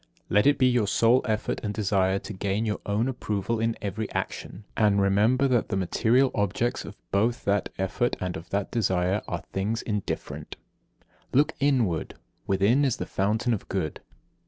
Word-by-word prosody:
Let 105 Hz, +6 st, +4 dB
it 145 Hz, -, +5 dB
be 130 Hz, -, +4 dB
your 120 Hz, -4 st, +3 dB
sole 115 Hz, +5 st, +4 dB
effort 110 Hz, -1 st, -1 dB
and 105 Hz, -2 st, -3 dB
desire 95 Hz, -2 st, +2 dB
to 105 Hz, -, -7 dB
gain 100 Hz, +3 st, -1 dB
your 105 Hz, -1 st, -1 dB
own 105 Hz, +4 st, +1 dB
approval 115 Hz, -3 st, -2 dB
in 115 Hz, 0 st, 0 dB
every 105 Hz, +2 st, -3 dB
action; 100 Hz, -, -4 dB
and 105 Hz, -2 st, +3 dB
remember 105 Hz, +7 st, +3 dB
that 120 Hz, -3 st, +1 dB
the 95 Hz, -, 0 dB
material 120 Hz, +8 st, +2 dB
objects 100 Hz, +4 st, -1 dB
of -, -, -10 dB
both 110 Hz, +5 st, +1 dB
that 100 Hz, 0 st, +1 dB
effort 95 Hz, +6 st, 0 dB
and 90 Hz, -1 st, -3 dB
of 80 Hz, -, -8 dB
that 100 Hz, 0 st, -2 dB
desire 95 Hz, -3 st, +1 dB
are -, -, -4 dB
things 105 Hz, +4 st, -1 dB
indifferent. 105 Hz, -3 st, -4 dB, 0.7 s
59. -, -, -41 dB
Look 150 Hz, +2 st, +2 dB
inward. 125 Hz, -, +1 dB, 0.3 s
Within 100 Hz, +9 st, +3 dB
is 135 Hz, -4 st, +1 dB
the -, -, -3 dB
fountain 110 Hz, +5 st, 0 dB
of 105 Hz, -, -5 dB
Good. 90 Hz, -6 st, -2 dB
105 Hz, 175 wpm, -26 LUFS, 100-120 Hz, 0.7 s, it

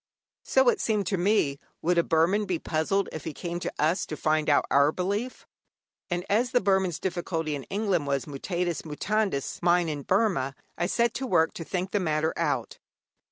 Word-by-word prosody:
So, -, -, +3 dB
it 455 Hz, -, 0 dB
seemed 210 Hz, -3 st, 0 dB
to 195 Hz, -, 0 dB
me, 175 Hz, -8 st, +2 dB, 0.2 s
would 175 Hz, +1 st, +3 dB
a -, -, +3 dB
Burman 170 Hz, +7 st, +2 dB
be 185 Hz, -3 st, -1 dB
puzzled 160 Hz, +6 st, 0 dB
if 155 Hz, -, -6 dB
he 160 Hz, -, -5 dB
came 175 Hz, 0 st, -4 dB
to -, -, -3 dB
us 170 Hz, +5 st, +2 dB
to 155 Hz, -, -5 dB
find 155 Hz, -1 st, +1 dB
out 145 Hz, -, +4 dB
our 140 Hz, +2 st, +5 dB
belief; 205 Hz, +9 st, -3 dB, 0.6 s
and 175 Hz, 0 st, -2 dB
as 230 Hz, +5 st, +2 dB
the 245 Hz, -, +5 dB
Burman's 190 Hz, -5 st, +1 dB
difficulty 170 Hz, -4 st, -2 dB
in 140 Hz, -2 st, -5 dB
England 195 Hz, -7 st, -1 dB
was, 140 Hz, -3 st, 0 dB
mutatis 175 Hz, +4 st, -3 dB
mutandis, 180 Hz, 0 st, -2 dB
mine 175 Hz, -1 st, +3 dB
in 145 Hz, -2 st, -3 dB
Burma, 180 Hz, -7 st, +1 dB, 0.2 s
I 175 Hz, -, -1 dB
set 235 Hz, +3 st, +1 dB
to 265 Hz, -, -3 dB
work 160 Hz, -8 st, +3 dB
to 165 Hz, -, -6 dB
think 185 Hz, +3 st, -3 dB
the 205 Hz, -, +1 dB
matter 160 Hz, -2 st, 0 dB
out. -, -, -2 dB
175 Hz, 190 wpm, -27 LUFS, 155-200 Hz, 0.6 s, our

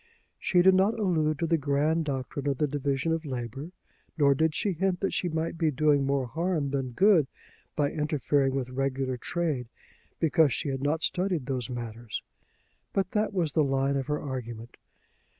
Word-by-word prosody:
She 180 Hz, -1 st, +3 dB
did 190 Hz, +1 st, +7 dB
not 200 Hz, +5 st, +3 dB
allude 160 Hz, -7 st, +1 dB
to 170 Hz, -, -1 dB
the 165 Hz, 0 st, +2 dB
grand 150 Hz, +3 st, +1 dB
doctrine 140 Hz, 0 st, -3 dB
of 140 Hz, -2 st, 0 dB
the 150 Hz, -, +2 dB
division 140 Hz, +1 st, -1 dB
of 165 Hz, 0 st, -1 dB
labour, 130 Hz, +1 st, -5 dB, 0.5 s
nor 140 Hz, -2 st, +5 dB
did 160 Hz, +2 st, +1 dB
she 205 Hz, -, 0 dB
hint 180 Hz, +1 st, 0 dB
that 195 Hz, -, 0 dB
she 180 Hz, -, 0 dB
might 165 Hz, +1 st, -2 dB
be 160 Hz, -2 st, +3 dB
doing 145 Hz, -1 st, +2 dB
more 140 Hz, -1 st, +1 dB
harm 160 Hz, +1 st, -1 dB
than 135 Hz, -3 st, -2 dB
good 185 Hz, -, +5 dB, 0.5 s
by 145 Hz, -1 st, +1 dB
interfering 145 Hz, -3 st, +1 dB
with 130 Hz, -2 st, -2 dB
regular 135 Hz, -1 st, -1 dB
trade, 150 Hz, -3 st, -2 dB, 0.5 s
because 160 Hz, -2 st, +4 dB
she 145 Hz, -, -2 dB
had 135 Hz, -1 st, -3 dB
not 150 Hz, +3 st, 0 dB
studied 180 Hz, -6 st, 0 dB
those 130 Hz, -3 st, -3 dB
matters. 120 Hz, -2 st, -5 dB, 0.7 s
But 190 Hz, -2 st, 0 dB
that 215 Hz, 0 st, +1 dB
was 170 Hz, -7 st, -1 dB
the 155 Hz, -, +3 dB
line 135 Hz, 0 st, +1 dB
of 135 Hz, -2 st, -2 dB
her 150 Hz, 0 st, -1 dB
argument. 120 Hz, -4 st, -6 dB
145 Hz, 180 wpm, -28 LUFS, 135-165 Hz, 0.7 s, did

